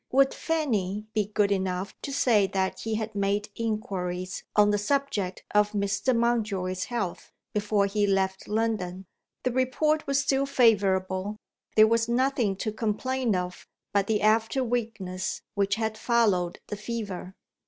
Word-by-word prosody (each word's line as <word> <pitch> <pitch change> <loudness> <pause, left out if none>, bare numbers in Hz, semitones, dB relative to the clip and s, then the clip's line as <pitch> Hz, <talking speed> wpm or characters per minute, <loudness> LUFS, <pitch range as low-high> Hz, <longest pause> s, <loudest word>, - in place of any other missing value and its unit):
Would 270 +1 +4
Fanny 215 - -1
be 210 -2 +1
good 205 -1 +1
enough 190 0 -1
to 280 - -4
say 225 -7 +3
that 190 -1 -1
he 225 -1 -2
had 220 0 -3
made 200 +1 0
inquiries 190 -5 -3
on 210 0 +5
the 205 - +1
subject 205 -6 -1
of 210 0 +3
Mr. 200 +5 +1
Mountjoy's 210 -6 0
health, 215 -8 -4 0.2
before 205 -1 +2
he 205 +1 +1
left 190 -1 0
London. 210 -4 -1 0.4
The 255 - +1
report 280 +5 +1
was 275 0 +2
still 275 0 +1
favourable; 200 -5 +2 0.4
there 215 - +8
was 230 +1 +2
nothing 245 -4 +1
to 215 +3 -3
complain 225 +2 -1
of 180 0 -4 0.3
but 200 -1 +2
the 215 -2 +1
after 225 +4 +3
weakness 215 -6 -3
which 200 -1 +1
had 220 -1 -2
followed 205 -7 +2
the 210 - -4
fever. 205 -4 -5
210 Hz, 145 wpm, -27 LUFS, 195-235 Hz, 0.4 s, there